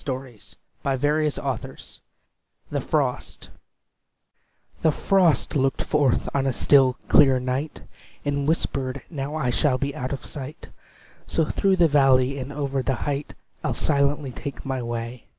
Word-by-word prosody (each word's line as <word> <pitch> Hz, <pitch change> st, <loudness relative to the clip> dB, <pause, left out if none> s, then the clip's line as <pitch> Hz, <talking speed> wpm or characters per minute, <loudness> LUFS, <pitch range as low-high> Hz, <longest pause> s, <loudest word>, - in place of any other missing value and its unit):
ROBERT 130 Hz, -4 st, -5 dB, 0.4 s
SOUTHEY 140 Hz, -1 st, -1 dB, 0.7 s
THE -, -, -1 dB
FROST -, -, -2 dB, 1.3 s
The 160 Hz, -, +4 dB
frost 180 Hz, -1 st, +2 dB
looked 135 Hz, -1 st, +1 dB
forth 145 Hz, -5 st, +1 dB
on 135 Hz, -1 st, +1 dB
a 130 Hz, -, +1 dB
still, 135 Hz, 0 st, +4 dB
clear 135 Hz, -3 st, +6 dB
night, 130 Hz, +4 st, -3 dB, 0.4 s
And 140 Hz, 0 st, -1 dB
whispered, 135 Hz, -4 st, -1 dB
"Now 145 Hz, -1 st, -4 dB
I 135 Hz, -6 st, 0 dB
shall 130 Hz, +1 st, +2 dB
be 140 Hz, +2 st, -2 dB
out 130 Hz, -4 st, -4 dB
of 135 Hz, -2 st, -5 dB
sight; 145 Hz, +3 st, -8 dB, 0.6 s
So 160 Hz, -, +1 dB
through 195 Hz, +4 st, +2 dB
the 175 Hz, -2 st, +5 dB
valley 135 Hz, -2 st, +3 dB
and 130 Hz, +2 st, -5 dB
over 140 Hz, -2 st, -2 dB
the 130 Hz, 0 st, 0 dB
height 145 Hz, 0 st, -3 dB, 0.3 s
I'll -, -, -1 dB
silently 140 Hz, -1 st, +1 dB
take 140 Hz, +3 st, -7 dB
my 135 Hz, -1 st, -2 dB
way. 115 Hz, 0 st, -5 dB
140 Hz, 135 wpm, -24 LUFS, 130-150 Hz, 1.3 s, clear